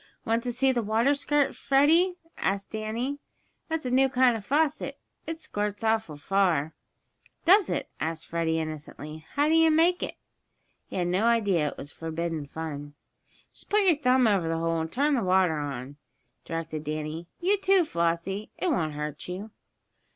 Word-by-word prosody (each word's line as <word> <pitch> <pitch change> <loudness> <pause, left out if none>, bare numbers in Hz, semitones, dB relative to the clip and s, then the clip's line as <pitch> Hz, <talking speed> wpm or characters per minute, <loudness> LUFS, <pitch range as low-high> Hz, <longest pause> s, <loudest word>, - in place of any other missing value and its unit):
"Want 230 +1 +1
to 245 - 0
see 265 +2 +2
the 245 -2 0
water 225 +6 +2
squirt, 290 0 +1
Freddie?" 320 +7 +3 0.2
asked 195 0 -1
Danny. 230 +6 -3 0.5
"That's 320 -3 -2
a 250 - -1
new 265 +1 +4
kind 255 -2 +4
of 220 - -5
faucet. 295 +6 0 0.3
It 325 0 -4
squirts 205 -5 -3
awful 220 -9 0
far." 165 -3 +1 0.7
"Does 385 +2 +6
it?" - - -2
asked 160 +1 -3
Freddie, 165 -1 -1
innocently. 155 0 -7
"How 290 +1 +2
do 315 - +3
you 325 0 +6
make 335 +3 +3
it?" - - -3 0.7
He - - -9
had 180 - 0
no 185 +5 +1
idea 205 -9 +3
it - - -5
was 145 - -8
forbidden 165 -2 -4
fun. 145 -2 -6 0.6
"Just - - -12
put 420 0 +3
your 350 -4 +5
thumb 255 -3 +3
over 195 -6 +2
the 165 - 0
hole, 165 0 0
and 160 0 -4
turn 290 +4 +2
the 255 - +2
water 185 -4 +3
on," 140 -1 -5 0.5
directed 165 -2 -4
Danny. 155 +2 -4
"You, 390 +4 +2
too, 385 -2 +4
Flossie. 170 - -1
It 365 - 0
won't 160 - 0
hurt 150 0 -5
you." 195 +5 -6
205 Hz, 175 wpm, -27 LUFS, -, 0.7 s, Does